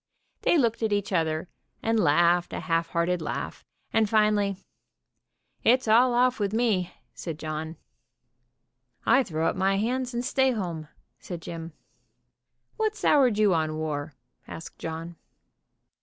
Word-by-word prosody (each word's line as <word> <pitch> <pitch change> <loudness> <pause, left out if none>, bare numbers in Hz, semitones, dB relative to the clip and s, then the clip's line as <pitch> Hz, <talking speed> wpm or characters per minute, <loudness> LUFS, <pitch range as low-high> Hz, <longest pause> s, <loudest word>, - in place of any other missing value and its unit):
They - - +3
looked 235 -6 +1
at 220 -1 0
each 205 -1 -1
other 160 -1 0 0.4
and 225 0 +2
laughed 175 +1 +3
a - - -3
half 165 -1 0
hearted 170 +1 0
laugh, - - -5 0.3
and 220 -2 +3
finally: 210 -2 +2 1.1
"It's 250 +1 +4
all 240 +3 +5
off 250 0 +3
with 200 0 -1
me," 210 -6 +1 0.2
said 165 -3 -6
John. 155 +1 -5 1.3
"I 270 - +5
throw 160 -9 -2
up - - 0
my 195 +1 +1
hands, 245 +3 -1
and 240 +1 -2
stay 265 -1 +2
home," 170 -8 -4 0.3
said 175 -2 -7
Jim. 165 -1 -7 1.0
"What 435 -1 0
soured 260 - +3
you 210 -3 +4
on 155 -2 0
war?" 150 -1 -3 0.3
asked 165 - -9
John. 165 +1 -6
195 Hz, 140 wpm, -26 LUFS, 165-230 Hz, 1.3 s, all